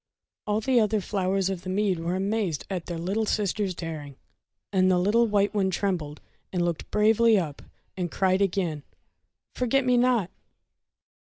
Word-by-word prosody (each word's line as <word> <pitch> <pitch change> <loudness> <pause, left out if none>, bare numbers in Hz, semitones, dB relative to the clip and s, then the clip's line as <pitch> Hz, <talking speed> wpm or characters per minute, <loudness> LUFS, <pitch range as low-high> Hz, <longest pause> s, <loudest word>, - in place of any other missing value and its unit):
All 210 +1 +1
the 255 +1 +3
other 215 -1 +2
flowers 195 -1 -1
of 185 -3 -4
the 185 - -7
mead 190 -2 0
were 170 +2 -2
amazed 195 -4 -1
at 180 -3 -4
their 175 - -4
little 195 +6 -1
sister's 205 -2 -1
daring, 155 -5 -6 0.6
and 185 -1 +4
the 185 - +3
little 215 +6 +3
white 205 -1 +1
one 195 -2 +1
trembled, 175 -5 -2 0.3
but 180 - -2
looked 170 -2 -2
bravely 220 +1 +4
up, 155 -6 -3 0.3
and 180 -2 -2
cried 190 +2 +1
again: 175 -6 0 0.4
— - - -53
"Forget 255 +2 +1
me 250 -1 +3
not 240 -7 +2
195 Hz, 165 wpm, -26 LUFS, 175-215 Hz, 0.6 s, and